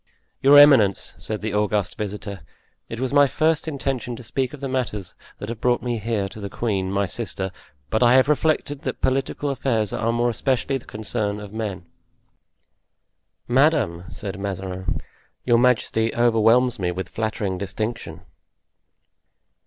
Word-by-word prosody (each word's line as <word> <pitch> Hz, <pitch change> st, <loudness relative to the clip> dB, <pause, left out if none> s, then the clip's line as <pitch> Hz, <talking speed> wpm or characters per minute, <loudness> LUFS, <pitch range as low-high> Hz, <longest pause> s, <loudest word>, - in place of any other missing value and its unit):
"Your 140 Hz, +2 st, +7 dB
eminence," 135 Hz, -9 st, +6 dB
said 110 Hz, -1 st, -4 dB
the 105 Hz, -1 st, -3 dB
august 105 Hz, -2 st, 0 dB
visitor, 100 Hz, -2 st, -5 dB, 0.5 s
"it 115 Hz, -, -6 dB
was 130 Hz, +1 st, -2 dB
my 145 Hz, -1 st, +6 dB
first 155 Hz, +3 st, +1 dB
intention 135 Hz, -5 st, -3 dB
to 120 Hz, -, -10 dB
speak 130 Hz, +2 st, -2 dB
of 150 Hz, -, -10 dB
the 140 Hz, -, -4 dB
matters 115 Hz, -8 st, -3 dB, 0.2 s
that 105 Hz, -, -7 dB
have 115 Hz, -1 st, -6 dB
brought 125 Hz, -1 st, +2 dB
me 120 Hz, -2 st, -2 dB
here 105 Hz, -2 st, -1 dB
to 105 Hz, -, -11 dB
the 100 Hz, -1 st, -5 dB
queen, 95 Hz, -5 st, -2 dB
my 100 Hz, 0 st, +1 dB
sister, 95 Hz, -2 st, -3 dB, 0.4 s
but 110 Hz, -, +1 dB
I 120 Hz, 0 st, +6 dB
have 130 Hz, +1 st, +5 dB
reflected 150 Hz, -1 st, 0 dB
that -, -, -4 dB
political 135 Hz, +2 st, 0 dB
affairs 115 Hz, -6 st, -1 dB
are 115 Hz, -, 0 dB
more 120 Hz, +1 st, +1 dB
especially 135 Hz, +2 st, 0 dB
the -, -, -19 dB
concern 105 Hz, -1 st, -3 dB
of 105 Hz, -1 st, -10 dB
men." 105 Hz, -5 st, -4 dB, 1.6 s
"Madame," 125 Hz, -, +2 dB
said 100 Hz, -2 st, -6 dB
Mazarin, 95 Hz, -5 st, -4 dB, 0.4 s
"your 120 Hz, -2 st, +4 dB
majesty 115 Hz, -2 st, +2 dB
overwhelms 120 Hz, +1 st, +3 dB
me 90 Hz, -2 st, 0 dB
with 95 Hz, +1 st, -4 dB
flattering 105 Hz, -4 st, -3 dB
distinction." 110 Hz, +4 st, -4 dB
115 Hz, 155 wpm, -23 LUFS, 100-130 Hz, 1.6 s, Your